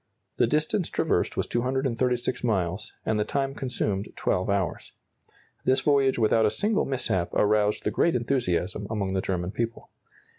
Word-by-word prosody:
The -, -, +4 dB
distance 155 Hz, +5 st, 0 dB
traversed -, -, 0 dB
was -, -, +1 dB
236 125 Hz, 0 st, -1 dB
miles, 95 Hz, -4 st, -1 dB
and 110 Hz, -1 st, +1 dB
the -, -, +3 dB
time 135 Hz, +3 st, -1 dB
consumed 105 Hz, -7 st, -2 dB
12 95 Hz, 0 st, 0 dB
hours. 100 Hz, -4 st, -1 dB, 0.7 s
This 130 Hz, +1 st, +3 dB
voyage 140 Hz, -2 st, +3 dB
without 110 Hz, -1 st, +3 dB
a -, -, +3 dB
single 210 Hz, -, +1 dB
mishap 120 Hz, -10 st, -1 dB
aroused 105 Hz, 0 st, +2 dB
the -, -, 0 dB
greatest 145 Hz, -8 st, +2 dB
enthusiasm 105 Hz, -5 st, -1 dB
among 100 Hz, -4 st, -2 dB
the 95 Hz, -, +1 dB
German 90 Hz, -1 st, -2 dB
people. 115 Hz, +1 st, -4 dB
115 Hz, 150 wpm, -26 LUFS, 100-130 Hz, 0.7 s, The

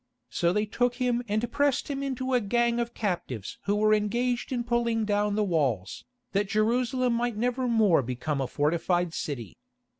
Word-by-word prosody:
So 170 Hz, 0 st, +1 dB
they 210 Hz, +3 st, +1 dB
took 245 Hz, +3 st, 0 dB
him 245 Hz, -2 st, 0 dB
and 215 Hz, +3 st, -1 dB
pressed 285 Hz, -2 st, +1 dB
him 275 Hz, -1 st, -3 dB
into 260 Hz, -1 st, -2 dB
a 250 Hz, -, +3 dB
gang 235 Hz, +3 st, +1 dB
of 235 Hz, 0 st, -3 dB
captives 175 Hz, -, -3 dB
who 205 Hz, -, +1 dB
were 215 Hz, +1 st, +3 dB
engaged 240 Hz, +5 st, 0 dB
in 245 Hz, -2 st, -1 dB
pulling 235 Hz, -2 st, 0 dB
down 205 Hz, 0 st, +1 dB
the 215 Hz, -, +2 dB
walls, 135 Hz, -, -1 dB, 0.3 s
that 200 Hz, 0 st, 0 dB
Jerusalem 245 Hz, +4 st, +1 dB
might 235 Hz, -1 st, -1 dB
nevermore 235 Hz, -, +2 dB
become 130 Hz, +4 st, -3 dB
a 135 Hz, -, -1 dB
fortified 170 Hz, +4 st, 0 dB
city. 130 Hz, -, -5 dB
215 Hz, 170 wpm, -27 LUFS, 175-240 Hz, 0.3 s, a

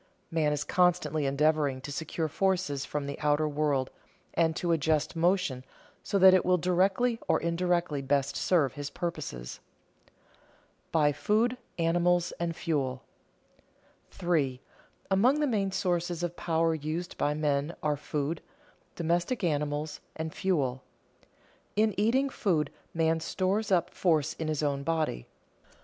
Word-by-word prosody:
Man 155 Hz, -2 st, +2 dB
is 145 Hz, -1 st, -1 dB
constantly 155 Hz, -5 st, +2 dB
endeavoring 145 Hz, -1 st, +2 dB
to 145 Hz, -, -7 dB
secure 160 Hz, +2 st, -2 dB
forces 175 Hz, -5 st, 0 dB
from 150 Hz, 0 st, -3 dB
the 140 Hz, -, -5 dB
outer 150 Hz, +1 st, +2 dB
world 145 Hz, -3 st, 0 dB, 0.4 s
and 160 Hz, -1 st, +2 dB
to 175 Hz, +1 st, -1 dB
adjust 155 Hz, -1 st, +1 dB
motion 170 Hz, -6 st, +1 dB, 0.4 s
so 200 Hz, -, -1 dB
that 190 Hz, -1 st, +8 dB
it 185 Hz, -, +4 dB
will 180 Hz, 0 st, +3 dB
directly 190 Hz, +7 st, +2 dB
or -, -, +3 dB
indirectly 170 Hz, -3 st, 0 dB
best 140 Hz, 0 st, 0 dB
serve 155 Hz, -8 st, +2 dB
his 145 Hz, -1 st, -5 dB
purposes. 145 Hz, -, -5 dB, 1.3 s
[Sidenote: -, -, -40 dB
By 150 Hz, -3 st, +3 dB
food, 220 Hz, -, +1 dB, 0.2 s
animals, 175 Hz, +1 st, +2 dB
and 170 Hz, -1 st, -2 dB
fuel] 135 Hz, -7 st, -2 dB, 1.1 s
3. 145 Hz, -8 st, 0 dB, 0.5 s
Among 245 Hz, +10 st, +4 dB
the 300 Hz, -, +2 dB
main 205 Hz, -7 st, 0 dB
sources 175 Hz, -2 st, -1 dB
of 175 Hz, 0 st, -2 dB
power 165 Hz, -1 st, +1 dB
used 160 Hz, +3 st, -4 dB
by 145 Hz, 0 st, +1 dB
men 150 Hz, +1 st, 0 dB
are 150 Hz, -1 st, +2 dB
food, 150 Hz, +2 st, -3 dB, 0.5 s
domestic 175 Hz, +8 st, 0 dB
animals, 150 Hz, -1 st, -1 dB, 0.2 s
and 160 Hz, 0 st, -4 dB
fuel. 135 Hz, -9 st, 0 dB, 0.9 s
In 215 Hz, 0 st, +3 dB
eating 240 Hz, +7 st, +2 dB
food 175 Hz, -11 st, 0 dB, 0.2 s
man 160 Hz, 0 st, +2 dB
stores 195 Hz, +5 st, -1 dB
up 180 Hz, -3 st, +2 dB
force 160 Hz, -4 st, +1 dB
in 160 Hz, -, -2 dB
his 155 Hz, -1 st, -1 dB
own 140 Hz, -1 st, 0 dB
body. 155 Hz, -, -1 dB
160 Hz, 135 wpm, -29 LUFS, 145-180 Hz, 1.3 s, that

